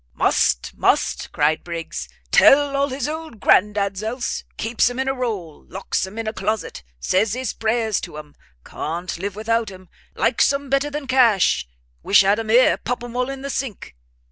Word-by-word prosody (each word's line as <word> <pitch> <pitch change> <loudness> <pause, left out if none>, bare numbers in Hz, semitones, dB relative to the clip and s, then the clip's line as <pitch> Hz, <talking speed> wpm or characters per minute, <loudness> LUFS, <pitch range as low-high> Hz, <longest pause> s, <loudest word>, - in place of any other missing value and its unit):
"Must, - - +1
must!" - - +1
cried 155 +2 +1
Briggs, 165 - -6 0.2
"tell 280 0 +5
all 280 0 +2
his 265 0 -3
old 315 -6 -6
grand 210 +2 +4
dads 200 -1 -1
else: 240 +4 -3
keeps 230 +2 +1
'em 245 - -7
in 265 0 -1
a 270 - +1
roll; 210 - -4
locks 190 0 -2
'em 200 +4 -11
in 225 - -3
a 220 - -2
closet; 215 - -3 0.2
says 200 - +1
his 255 -2 -3
prayers 220 -2 0
to 150 - -8
'em; 150 -1 -10 0.3
can't 170 +3 -5
live 200 +1 -4
without 225 0 0
'em: 185 -2 -13 0.3
likes 235 - +3
'em 280 -1 -4
better 275 +1 +2
than 295 0 -5
cash! 235 - +3 0.3
wish 200 - +5
had 200 +2 +2
'em 225 -1 -5
here! 245 +3 +5
pop 245 0 -4
'em 240 0 -8
all 250 +1 0
in 275 0 -6
the 280 - -3
sink!" 255 - -5
225 Hz, 190 wpm, -21 LUFS, 190-260 Hz, 0.3 s, tell